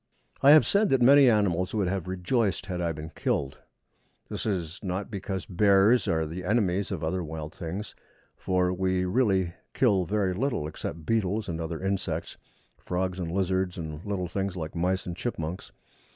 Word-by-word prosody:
I 140 - +6
have 155 +1 +8
said 205 +1 +3
that 135 - +3
many 135 +2 +7
animals 95 -4 +1
would 100 -4 +1
have 95 -1 -2
rejoiced 95 +2 0
had 90 -2 -3
I 85 -1 0
been 80 0 -7
killed. 70 -4 -2 0.7
This - - -4
is 90 -5 -2
not 95 +1 -3
because 95 -2 -4
bears 100 +5 +4
are 80 -3 +1
the 85 +4 -6
enemies 100 -1 +1
of 90 -5 -3
other 90 +3 -1
wild 80 0 -6
things, 90 +4 -6 0.4
for 90 -1 0
we 95 0 0
really 95 -4 +1 0.2
kill 100 -8 +3
very 100 -1 0
little 115 - -1
except 80 +1 -6
beetles 110 -1 0
and 85 -1 -3
other 80 0 -4
insects, 95 -4 -3 0.4
frogs 90 +1 -2
and 85 -2 -3
lizards, 95 0 0
and 80 -1 -6
little 100 -3 -2
things 95 +1 -3
like 80 -3 -5
mice 90 +2 0
and 90 - -5
chipmunks. 85 -7 -4
95 Hz, 170 wpm, -27 LUFS, 85-100 Hz, 0.7 s, have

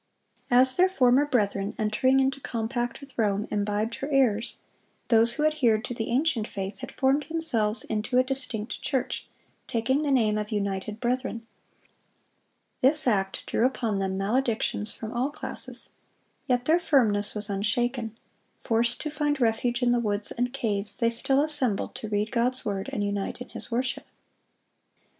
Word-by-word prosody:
As 255 +1 +5
their 370 +1 +5
former 270 -4 +4
brethren, 200 -6 0
entering 240 +5 +2
into 270 +1 +1
compact 240 +2 -3
with 280 -2 -13
Rome, 205 -1 +1
imbibed 210 +2 -1
her 275 - -4
errors, 240 -6 +2 0.5
those 230 0 +5
who 300 - 0
adhered 245 -8 +2
to - - -4
the 225 -2 -4
ancient 245 -3 +1
faith 195 0 -5
had 260 0 -7
formed 275 +2 +1
themselves 235 -10 0
into 220 +3 -1
a 255 - +6
distinct 255 -4 -4
church, 265 -1 -2 0.4
taking 250 +5 +1
the 300 - -1
name 220 -6 +3
of 210 0 -4
"United 200 0 -2
Brethren." 240 -1 -2 1.4
This 295 +4 +3
act 195 -5 0
drew - - 0
upon 235 -5 0
them 190 0 -1
maledictions 220 0 0
from 220 +1 -7
all 250 +3 0
classes. 295 - -5 0.6
Yet 245 -2 +1
their 325 +4 +4
firmness 220 -12 +3
was 210 -1 0
unshaken. 225 +3 -1 0.4
Forced 235 +1 +1
to 305 - -4
find 295 -1 0
refuge 240 +1 +1
in 240 - +4
the 240 - +3
woods 205 -2 -2
and 245 +1 -1
caves, 205 -5 -2
they 230 -1 +2
still 270 +4 +2
assembled 265 -9 0
to 220 - -5
read 210 +1 -1
God's 250 +1 0
word 195 -2 -2
and 205 - -2
unite 200 +1 -2
in 250 - -8
His - - -4
worship. 245 +2 -2
235 Hz, 160 wpm, -27 LUFS, 210-265 Hz, 1.4 s, a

